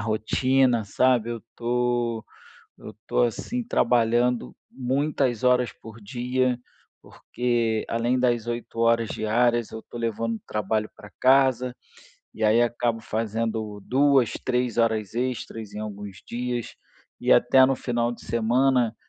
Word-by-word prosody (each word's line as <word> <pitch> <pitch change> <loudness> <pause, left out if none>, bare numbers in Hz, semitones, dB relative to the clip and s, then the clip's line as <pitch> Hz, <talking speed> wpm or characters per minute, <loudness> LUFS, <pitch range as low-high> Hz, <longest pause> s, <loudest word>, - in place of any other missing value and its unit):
rotina, 120 +3 +1
sabe. 120 +2 +2
Eu 120 - -3
estou 120 0 -2 0.5
eu - - -10
estou, 110 +3 -1
assim, 240 - -3
trabalhando 120 - +1 0.2
muitas 130 -2 -1
horas 125 -1 +3
por 110 0 -11
dia, 125 +3 -1 0.4
porque 120 -3 -2
além 120 +2 +1
das 120 -2 +1
8 120 -1 -5
horas 115 -1 +2
diárias 120 +1 +1
eu 110 - -6
estou 120 - -10
levando 115 0 -2
trabalho 105 +1 -1
para 105 - -13
casa, 130 -1 +3 0.6
e - - -8
aí 110 +2 +4
acabo 120 -1 0
fazendo 110 -1 -3
2, 135 -3 +3
3 125 -2 0
horas 110 -3 +1
extras 120 -3 -4
em 105 - -7
alguns 105 -2 -7
dias, 120 0 -4 0.5
e - - +3
até 130 0 +6
no 135 - +1
final 120 -2 -1
de 120 - -12
semana, 120 +1 +2
120 Hz, 130 wpm, -25 LUFS, 110-125 Hz, 0.6 s, até